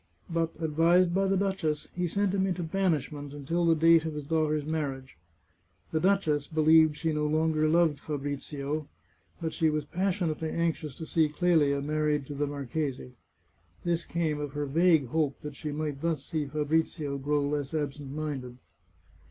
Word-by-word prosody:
But, 165 0 0
advised 170 +3 +3
by 195 +1 +2
the 195 0 +2
duchess, 185 -6 -1
he 180 0 0
sent 200 +2 0
him 190 -1 +1
into 180 -2 -2
banishment 155 -5 -1
until 165 +5 -1
the 165 - +5
date 165 0 +5
of 160 -1 -4
his 150 -1 -5
daughter's 155 -1 0
marriage. 140 -4 -3 0.8
The 160 - +1
duchess 160 -6 +2
believed 155 -1 +4
she 160 0 -1
no 150 0 0
longer 155 0 +2
loved 160 -3 +3
Fabrizio, 145 0 -4 0.5
but 160 -2 -3
she 160 -2 +2
was 150 -1 -1
passionately 175 -4 -1
anxious 160 -4 -2
to 160 - -7
see 160 -1 +2
Clelia 150 -4 +2
married 150 -1 0
to 145 - -7
the 145 +1 -1
marchese. 140 -2 -4 0.7
This 170 -1 -1
came 160 -3 -1
of 145 -2 -4
her 145 0 -2
vague 160 -2 +3
hope 150 -1 0
that 150 -1 -7
she 150 - -5
might 150 -2 -3
thus 160 -4 -1
see 155 -3 -2
Fabrizio 150 0 -1
grow 145 +1 +1
less 145 -1 -2
absent 145 -2 -3
minded. 140 -5 -4
155 Hz, 165 wpm, -29 LUFS, 145-165 Hz, 0.8 s, the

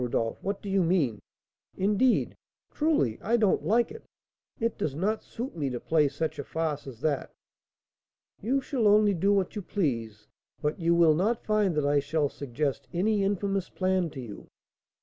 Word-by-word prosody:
Rodolph, 115 -2 -1
what 200 0 -3
do - - -7
you 195 0 +2
mean? 160 - +1 0.6
Indeed 210 +6 +2 0.4
truly 295 - +1
I 235 +3 +2
don't 210 -4 +2
like 235 +3 +2
it; 455 - -10 0.6
it 230 -1 0
does 140 -3 -2
not 205 +7 -1
suit 245 +4 -6
me 145 -4 -1
to 125 -1 -4
play 155 +1 +2
such 155 +2 -3
a - - -2
farce 155 -2 -3
as 125 -3 -10
that." 145 -3 -1 1.1
"You 265 +6 +1
shall 255 -5 0
only 205 0 +5
do 195 +3 +2
what 195 -1 +1
you 210 - -3
please; 115 - -2 0.3
but 150 +3 -2
you 170 0 +2
will 170 -2 +6
not 210 +9 0
find 210 -5 +2
that 150 -1 +1
I 145 0 +3
shall 145 0 0
suggest 140 +1 -3
any 200 +4 +1
infamous 195 -1 -1
plan 185 -2 0
to 145 - -9
you. 115 -5 -9
175 Hz, 175 wpm, -28 LUFS, 145-205 Hz, 1.1 s, will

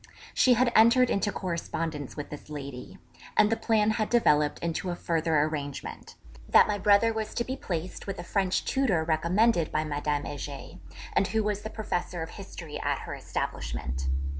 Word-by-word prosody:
She 250 -1 +5
had 240 +1 +3
entered 235 +3 +6
into 205 +1 +1
correspondence 165 -6 -4
with 145 - -6
this 150 0 -9
lady, 140 -4 -7 0.4
and 215 0 +5
the - - +3
plan 220 -2 +2
had 215 0 -1
developed 150 -11 +3
into 170 +2 -3
a 175 - -2
further 165 -2 0
arrangement, 145 -2 -4 0.3
that - - +7
my 205 -1 -1
brother 205 +3 +4
was 220 -1 -4
to 235 - +1
be 260 +2 -4
placed 180 -5 -5
with 195 0 -4
a - - -6
French 190 -2 0
tutor 225 -12 +1
recommended 170 +4 +2
by 155 - +1
Madame 145 -1 -2
Heger, 145 -1 -7 0.3
and 195 - +3
who 220 -1 0
was 205 -1 -1
the 220 - -5
Professor 180 -6 -3
of 160 - -8
History 170 -6 -8
at - - -1
her - - -6
establishment. 60 +2 -4
180 Hz, 175 wpm, -28 LUFS, 150-215 Hz, 0.4 s, that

